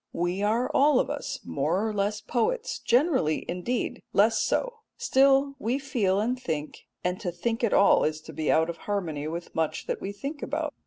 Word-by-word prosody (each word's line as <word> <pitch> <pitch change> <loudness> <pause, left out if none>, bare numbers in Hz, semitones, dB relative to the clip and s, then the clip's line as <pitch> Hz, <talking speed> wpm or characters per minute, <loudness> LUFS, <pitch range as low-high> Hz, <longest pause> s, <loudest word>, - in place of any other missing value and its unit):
We 175 +3 -1
are 225 +5 +1
all 285 -2 +5
of - - 0
us - - -4
more 205 +4 0
or 215 - -2
less 210 +1 -1
poets 465 - -1
generally, 250 - +2
indeed, 180 +8 -2
less 220 +3 +4
so; - - -1 0.2
still 275 - +3
we 235 +5 0
feel 230 -9 0
and 245 +4 -1
think, 155 -7 -5 0.2
and 180 +1 -1
to 175 - -3
think 225 +7 -2
at 230 - +2
all 200 - +5
is 155 0 0
to - - -11
be 155 - 0
out 160 +1 +3
of 170 0 -5
harmony 160 -8 -2
with 170 +2 -6
much 160 -1 -1
that - - -3
we 195 - -4
think 275 +9 -6
about. 300 0 -3
215 Hz, 195 wpm, -27 LUFS, 175-270 Hz, 0.2 s, all